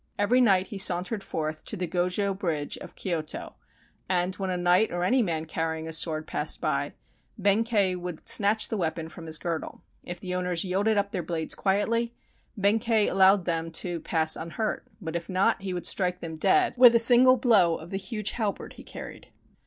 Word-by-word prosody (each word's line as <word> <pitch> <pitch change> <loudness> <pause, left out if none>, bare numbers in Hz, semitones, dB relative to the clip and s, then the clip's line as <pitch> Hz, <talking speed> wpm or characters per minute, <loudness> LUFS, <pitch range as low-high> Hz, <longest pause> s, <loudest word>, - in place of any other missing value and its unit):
Every 235 +5 +3
night 195 -6 +4
he 205 -4 -6
sauntered 190 +3 0
forth 155 -2 -4
to 215 - -3
the 180 - -2
Go 175 +1 0
jo 200 +2 0
Bridge 165 -7 -3
of - - -11
Kyoto, 165 -4 -4 0.6
and 180 0 +1
when 190 -1 -3
a 180 - -1
knight 180 +4 +3
or 175 0 -2
any 250 +8 +3
man 165 -6 -1
carrying 160 0 -3
a 160 - -5
sword 155 -1 -1
passed - - -2
by, - - -1 0.4
Benkei 205 -1 +2
would 180 -2 -7
snatch 210 +2 +2
the 220 - -2
weapon 160 -2 -2
from 165 +1 -10
his 160 0 +2
girdle. 165 0 -5 0.2
If 175 0 -7
the 180 -1 -5
owners 180 -2 -1
yielded 200 +4 +1
up 200 0 0
their 185 - -2
blades 160 -1 -2
quietly, 230 +4 0 0.4
Benkei 215 +2 +2
allowed 190 0 +5
them 165 -1 -1
to 175 0 -2
pass 160 -1 0
un 165 - -6
hurt, 215 +6 -3
but 165 -4 -6
if 170 0 -4
not, 185 +1 +1
he 195 -1 -4
would 180 -1 -4
strike 180 -2 0
them 160 -1 -6
dead 375 - +3
with 245 -1 +8
a - - +8
single 245 +2 +6
blow 210 -9 +4
of 165 +2 -10
the 195 - -2
huge 210 +2 -3
halberd 215 -4 -3
he - - -12
carried. - - -10
185 Hz, 200 wpm, -27 LUFS, 165-210 Hz, 0.6 s, with